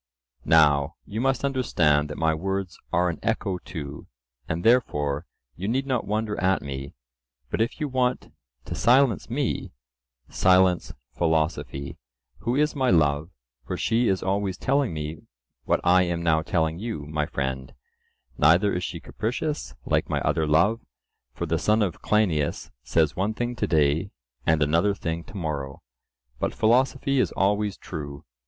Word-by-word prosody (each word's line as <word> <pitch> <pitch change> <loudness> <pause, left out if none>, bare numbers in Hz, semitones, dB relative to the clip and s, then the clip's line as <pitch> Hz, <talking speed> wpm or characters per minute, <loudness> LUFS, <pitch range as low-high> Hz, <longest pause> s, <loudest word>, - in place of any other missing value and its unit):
Now 75 -1 +4
you 110 +2 -4
must 135 0 +1
understand 80 - +2
that 75 - -6
my 80 -1 +2
words 95 +3 -3
are 90 +1 +2
an 85 - -3
echo 100 -5 -1
too, 70 -4 -8 0.4
and 85 +1 -2
therefore 75 - +2 0.3
you 95 - -4
need 130 +5 0
not 130 -4 -1
wonder 105 -1 -1
at 95 +1 +2
me; 70 0 -6 0.6
but - - 0
if 115 +6 -1
you 150 - -1
want 125 -2 -1 0.3
to - - -5
silence 125 -2 +3
me, 130 - -2 0.5
silence 90 -1 +3 0.2
philosophy, 80 -4 -1 0.4
who 120 +2 -1
is 150 +2 +1
my 130 -2 +1
love, 75 -2 +2 0.4
for - - -3
she 115 +1 +1
is 95 -1 +1
always 95 -1 -1
telling 135 -1 +1
me 75 0 -5 0.5
what - - +2
I 90 +1 +5
am 85 -1 -1
now 80 -2 +3
telling 80 0 0
you, 105 -9 -4
my 75 0 -2
friend; 65 -1 -3 0.7
neither 85 +7 +5
is 90 - -2
she - - -4
capricious 125 +8 -3
like - - +1
my - - 0
other 80 -1 +1
love, 100 +10 +3 0.5
for 85 - -4
the 80 0 0
son 105 +4 +3
of 95 -5 -3
Cleinias 90 -9 0
says 80 +1 +1
one 100 +4 -1
thing 120 +1 -2
to 105 - -1
day 80 +3 +2 0.4
and 80 -2 +4
another 85 +7 +2
thing 85 -3 -3
to 100 - -10
morrow, 70 -7 -4 0.6
but - - -1
philosophy 130 +4 +2
is - - +2
always 105 +1 +1
true. 70 -4 -7
90 Hz, 155 wpm, -25 LUFS, 75-110 Hz, 0.7 s, I